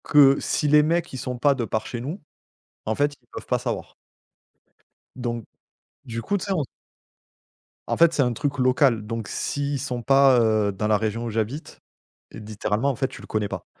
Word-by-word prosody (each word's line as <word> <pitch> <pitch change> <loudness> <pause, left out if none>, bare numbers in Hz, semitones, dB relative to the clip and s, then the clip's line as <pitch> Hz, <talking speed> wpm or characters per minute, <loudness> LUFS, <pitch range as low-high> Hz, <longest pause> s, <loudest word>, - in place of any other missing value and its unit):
Que 140 -2 +6
si 150 - 0
les 150 +1 +6
mecs, 170 +1 0
ils - - -4
sont 125 -1 -4
pas 140 +3 +4
de 130 -3 -3
par 110 -1 -2
chez 120 0 -5
nous, 155 +11 -5 0.7
en 110 - 0
fait, 145 +4 +1
ils - - -35
peuvent - - -8
pas - - +1
savoir - - -4 1.2
donc, 120 -3 -4 0.6
du 115 -1 -4
coup, 200 - 0
tu 185 - -5
sais, 200 - -3
on 160 -6 0 1.2
En - - -1
fait, 170 0 +5
c'est 150 - +2
un 125 -1 0
truc 145 +2 -2
local. 125 -3 +3
Donc 115 -1 -4
s'ils 140 +6 -2
sont 125 -2 -3
pas, 135 0 +5
heu, 110 -3 +2
dans 100 +2 -2
la 105 -1 +4
région 110 +2 -2
où - - -3
j'habite, 115 +7 -3 0.5
littéralement, 110 +3 -2
en 135 - -1
fait, 130 +2 0
tu 130 - -11
le - - -12
connais 105 -1 -1
pas. - - -6
125 Hz, 200 wpm, -24 LUFS, 110-145 Hz, 1.2 s, Que